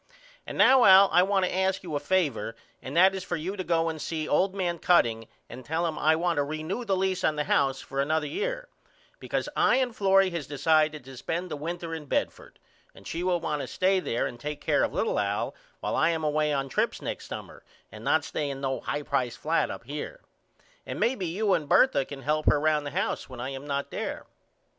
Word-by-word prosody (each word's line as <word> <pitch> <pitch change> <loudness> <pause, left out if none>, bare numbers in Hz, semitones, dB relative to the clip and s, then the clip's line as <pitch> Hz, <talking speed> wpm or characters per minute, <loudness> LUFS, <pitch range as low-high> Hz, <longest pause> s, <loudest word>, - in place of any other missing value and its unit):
And - - -6
now 260 -1 +6
Al 195 -1 +8
I 180 - +6
want 195 0 +2
to 180 - -2
ask 190 0 0
you 170 -4 -6
a - - +1
favor 145 - 0 0.3
and 130 +5 -5
that 190 +2 +6
is 190 -1 -4
for 175 - -3
you 175 +5 -4
to 190 - -4
go 165 -1 +1
and 160 -2 -4
see 155 -2 -3
old 190 +6 +2
man 175 -3 -1
Cutting 115 -12 +2 0.2
and 125 +2 -10
tell 160 +5 -1
him 160 -2 -3
I 155 +1 +4
want 170 0 0
to 145 - +3
ree 155 +2 -5
new 195 +10 -3
the 200 -4 0
lease 190 -1 0
on 155 - +2
the 150 - 0
house 135 -2 +1
for 135 0 -3
another 155 +2 0
year - - -3 0.5
because - - -2
I - - +4
and 255 -3 0
Florrie 195 -1 +4
has 170 -5 -4
decided 155 0 +1
to 135 0 -10
spend 170 +7 -3
the - - -2
winter 165 +2 -5
in 160 -2 -6
Bedford - - -3 0.4
and - - -16
she 165 - -4
will 180 -1 +1
want 150 -3 -2
to - - -5
stay 190 +1 +2
there 120 -9 -1
and 120 - -6
take 150 +3 -5
care - - +1
of - - 0
little - - 0
Al 100 0 -1 0.3
while - - -2
I 165 - +3
am 165 -1 -1
away 150 0 +1
on 135 -1 -1
trips - - -1
next - - -5
summer - - -8 0.3
and - - -11
not - - +2
stay 145 - -3
in 135 -1 -5
no 135 -1 -2
high 145 +1 -3
price 130 -4 -1
flat 160 +2 0
up - - -7
here. 150 - -6 0.6
And - - -6
may 240 - +2
be 190 -8 -4
you 195 +4 +1
and 150 -5 -1
Bertha 260 - +4
can 135 -1 -9
help 155 +1 0
her 145 - +5
round 150 -1 +1
the 145 +5 -5
house 195 -6 -2
when 130 -2 -9
I 125 +2 -3
am 135 +1 -7
not 140 0 -3
there. - - -4
160 Hz, 235 wpm, -27 LUFS, 145-185 Hz, 0.6 s, Al